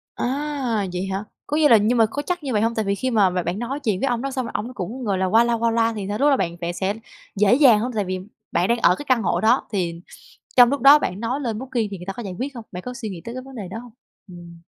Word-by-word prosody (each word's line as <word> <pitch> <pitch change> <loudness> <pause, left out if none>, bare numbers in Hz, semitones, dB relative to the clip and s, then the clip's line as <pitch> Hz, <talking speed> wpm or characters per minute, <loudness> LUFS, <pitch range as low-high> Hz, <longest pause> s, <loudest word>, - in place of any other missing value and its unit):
À, 265 -5 -2
vậy 180 +1 -3
hả? 195 +2 -3 0.2
Có 295 - -1
nghĩa 305 -1 +5
là 230 - +8
nhưng 220 +4 +2
mà 225 - +5
có 285 - -3
chắc 360 -2 -2
như 275 -3 -3
vậy 210 -2 +1
hông? 230 +1 +1
Tại 220 -2 -1
vì 200 - 0
khi 255 +6 -2
mà 205 -5 +3
b 180 - -7
bạn 175 +3 -2
nói 255 +5 -4
chuyện 215 -9 -1
với - - +1
ông 240 -1 -1
đó 275 - -2
xong 260 -1 -3
rồi - - -7
ổng 245 +4 -4
cũng, 235 +5 -5
gọi 200 -4 0
là, 190 - +1
qua 225 +5 +4
loa 235 0 +1
qua 230 0 +1
loa 230 0 +2
thì 205 -3 -5
sao, 205 +1 -2
lúc 285 - +3
đó 275 - +4
bạn 170 -6 -2
bạn 170 0 -2
sẽ 190 +2 -1 0.4
dễ 205 +2 +4
dàng 250 -6 +6
hông? 245 +3 -2
Tại 210 -2 -1
vì 185 0 -3 0.3
bạn 180 - +1
đang 235 - +2
ở 180 - +4
cái 290 - -8
căn 250 -3 +3
hộ - - 0
đó 230 +4 +3
thì 170 -4 -2 0.6
trong 245 -1 +8
lúc 280 0 -1
đó 280 +4 +8
bạn 190 -8 -3
nói 245 +5 -2
lên 230 -6 -3
Booking 245 -3 -2
thì 195 - -6
người 180 - -10
ta 195 - -3
có 240 - -7
giải 195 -4 -6
quyết 275 +2 -4
hông? 235 -3 -8
Bạn 180 0 -6
có 250 +4 -6
suy 245 -4 -5
nghĩ 185 -4 -7
tới 235 - -7
cái 255 - -6
vấn 270 +1 -13
đề 200 -5 -6
đó 225 - -5
hông? 240 0 -11 0.4
Ừm. 170 -2 -12
230 Hz, 320 wpm, -22 LUFS, 195-255 Hz, 0.6 s, là